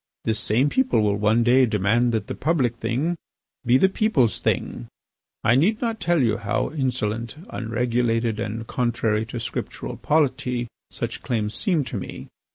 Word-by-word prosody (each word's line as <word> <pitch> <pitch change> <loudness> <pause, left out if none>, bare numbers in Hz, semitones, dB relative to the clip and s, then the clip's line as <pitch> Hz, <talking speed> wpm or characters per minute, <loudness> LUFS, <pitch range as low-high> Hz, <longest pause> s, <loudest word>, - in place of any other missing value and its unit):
This 110 -1 +1
same 120 +6 +2
people 260 - +2
will 105 -1 +2
one 105 +3 +3
day 125 +2 +5
demand 110 +3 +2
that 110 -2 -1
the - - -5
public 140 -7 0
thing 130 +10 -1 0.5
be 125 +1 +4
the 190 - +5
people's 190 - +1
thing. - - -2 0.6
I 120 - +4
need 185 - +3
not 230 -2 -2
tell 175 -5 +2
you 110 -2 +2
how 105 -3 -1
insolent, 120 -5 -2 0.2
unregulated, 115 -1 0
and 115 0 -4
contrary 115 -3 0
to 120 - -5
Scriptural 115 - -5
polity 130 -5 +1 0.2
such - - -5
claims 110 -3 -2
seem 170 - +1
to 125 - -5
me. 95 - -7
120 Hz, 160 wpm, -23 LUFS, 110-140 Hz, 0.6 s, day